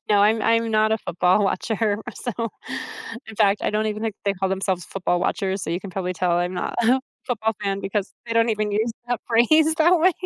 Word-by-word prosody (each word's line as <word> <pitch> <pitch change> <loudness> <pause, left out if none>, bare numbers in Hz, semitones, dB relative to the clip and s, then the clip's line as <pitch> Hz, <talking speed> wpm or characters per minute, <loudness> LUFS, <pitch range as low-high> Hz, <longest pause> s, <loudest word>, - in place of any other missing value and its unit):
No, 205 - +5
I'm 215 +2 +4
I'm 230 0 +2
not 215 0 +3
a 220 - +1
football 180 +3 +2
watcher, 210 +2 0 0.2
so, 245 - -4 0.9
in 220 - -9
fact, 205 -1 +3
I - - +1
don't 215 +1 0
even 215 0 -3
think 220 -3 -2
they 200 - +2
call 190 0 -1
themselves 190 -2 -1
football 180 -2 -1
watchers, 190 0 -1
so 160 - -3
you 175 - -1
can 195 - -8
probably 185 -1 -2
tell 175 0 +1
I'm 175 +1 0
not 180 - -3
a 250 +4 +4 0.3
football 220 -3 -1
fan 195 0 -1
because 200 0 -3
they 230 - -3
don't 230 0 +3
even 215 -1 0
use 220 +3 +1 0.2
that 245 -1 -1
phrase 310 +7 +4
that 345 +2 +5
way. 365 +2 +5
210 Hz, 220 wpm, -23 LUFS, 190-230 Hz, 0.9 s, No